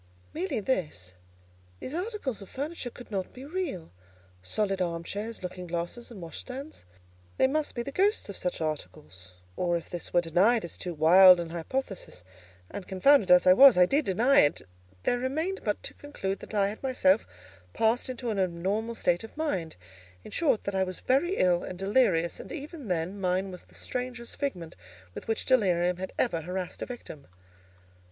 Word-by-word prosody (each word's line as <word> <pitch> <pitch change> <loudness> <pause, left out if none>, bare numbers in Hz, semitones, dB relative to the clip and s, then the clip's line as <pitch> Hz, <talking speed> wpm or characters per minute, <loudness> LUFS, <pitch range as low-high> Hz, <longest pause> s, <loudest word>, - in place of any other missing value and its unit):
Merely 190 +3 -2
this—These 90 - -6
articles 355 - -3
of 195 - -11
furniture 285 -1 -4
could 245 -1 -13
not 190 -3 -3
be 255 +2 -10
real, 300 - -4 0.5
solid 195 - -1
arm 170 -2 -2
chairs, 210 +4 -5
looking 180 0 -6
glasses, 175 +8 -4
and 230 -5 -10
washstands—they 90 - -6
must 295 +3 -1
be 240 - -2
the 275 - -6
ghosts 405 +8 +1
of 200 - -7
such 180 -2 -3
articles; 90 - -6 0.2
or, 175 -1 +1
if 170 - -10
this 175 - -5
were 175 - +4
denied 185 +7 +3
as 170 - -7
too 175 -2 -5
wild 180 +4 +8
an 170 -1 -4
hypothesis—and, 95 - -7
confounded 195 +3 +4
as 180 0 +7
I 185 - +8
was, 265 0 +8
I 180 - +7
did 285 +10 +1
deny 235 +9 +4
it—there 90 - -1
remained 315 +10 -2
but - - -2
to - - -5
conclude 195 -10 -4
that - - -9
I 200 -1 +3
had 210 - -8
myself 225 -6 +2 0.5
passed 230 +3 +1
into 245 -2 -3
an 205 - -2
abnormal 190 +6 -1
state 175 -4 +1
of 225 - -11
mind; 190 - -2 0.5
in - - -11
short, 300 -10 +1
that 200 - -3
I 190 0 +2
was 185 -1 -5
very 315 +9 +1
ill 175 -1 +3
and 185 - -6
delirious: 195 -4 +2
and - - -9
even 295 -3 -7
then, 180 +2 -2
mine 185 +1 0
was 180 - -9
the - - -18
strangest 250 -1 -5
figment 180 - -4 0.4
with - - -8
which 225 - -1
delirium 180 -8 +3
had 190 +1 -5
ever 170 -10 +1
harassed 180 +2 -5
a - - -3
victim. 230 - -9
190 Hz, 175 wpm, -28 LUFS, 170-250 Hz, 0.5 s, wild